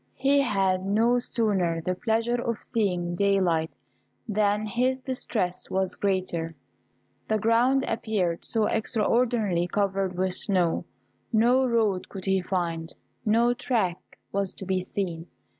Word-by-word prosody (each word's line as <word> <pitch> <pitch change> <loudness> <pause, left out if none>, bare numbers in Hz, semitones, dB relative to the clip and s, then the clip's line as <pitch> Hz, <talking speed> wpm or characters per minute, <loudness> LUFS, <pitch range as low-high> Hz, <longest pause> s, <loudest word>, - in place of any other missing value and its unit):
He 275 +2 +3
had 195 -6 +1
no 225 +5 +3
sooner 195 -9 0
the 180 +3 -1
pleasure 230 +5 0
of 235 -2 -3
seeing 180 -7 -1
daylight 180 -4 +1 0.5
than 210 0 +1
his 250 +5 0
distress 225 -8 -3
was 190 -1 -1
greater. 180 -4 -1 0.7
The 220 - +2
ground 235 +5 +3
appeared 205 -7 -1
so 220 -2 +1
extraordinarily 220 -5 +1
covered 195 -1 -1
with 185 0 0
snow, 180 -4 +1 0.5
no 245 +4 +4
road 220 -6 +1
could 190 -2 -7
he 190 -1 +2
find 170 -3 -2 0.4
no 235 +3 +4
track 230 -8 -2
was 200 -1 -1
to 195 - -8
be 185 0 0
seen. 180 -3 -4
200 Hz, 125 wpm, -26 LUFS, 185-230 Hz, 0.7 s, no